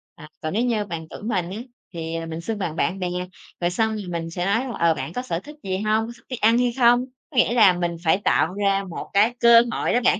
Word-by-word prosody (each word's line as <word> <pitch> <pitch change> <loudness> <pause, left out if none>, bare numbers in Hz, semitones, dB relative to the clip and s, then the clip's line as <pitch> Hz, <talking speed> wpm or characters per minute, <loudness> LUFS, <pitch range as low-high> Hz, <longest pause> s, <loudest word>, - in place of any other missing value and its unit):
à, 155 - -12
còn 155 +2 -3
nếu 225 - +1
như 225 -4 0
bằng 165 -4 -6
tuổi - - -10
mình 185 -6 -1
á 195 - -5 0.4
thì, 165 0 -4
à, 165 - -3
mình 165 0 -6
xưng 220 +5 -3
bằng 170 -5 -3
bạn 190 +3 -1
bè. 180 - -1 0.5
Rồi 175 - +1
xong 220 +3 0
rồi 210 -2 -5
mình 170 -1 -3
thì 165 - -6
sẽ 175 +2 -3
nói, 215 +5 +1 0.2
ờ, 170 -1 +4
bạn 165 - -6
có 250 - -2
sở 170 -10 -3
thích 295 +10 -12
gì 190 -1 -2
hông? 215 +2 0
Có - - -7
thích - - -24
đi 255 - -3
ăn 225 +1 +4
hay 245 -1 +1
không? 245 0 +5 0.2
Có 270 - -10
nghĩa 240 - +4
là 215 -6 +6
mình 175 -1 -2
phải 160 +2 +3
tạo 180 -4 +1
ra 200 -1 +1
một 170 - -7
cái 210 +4 +4
cơ 235 0 +8
hội - - -1
đó 245 - +4
bạn. - - +4
200 Hz, 285 wpm, -23 LUFS, 170-230 Hz, 0.5 s, cơ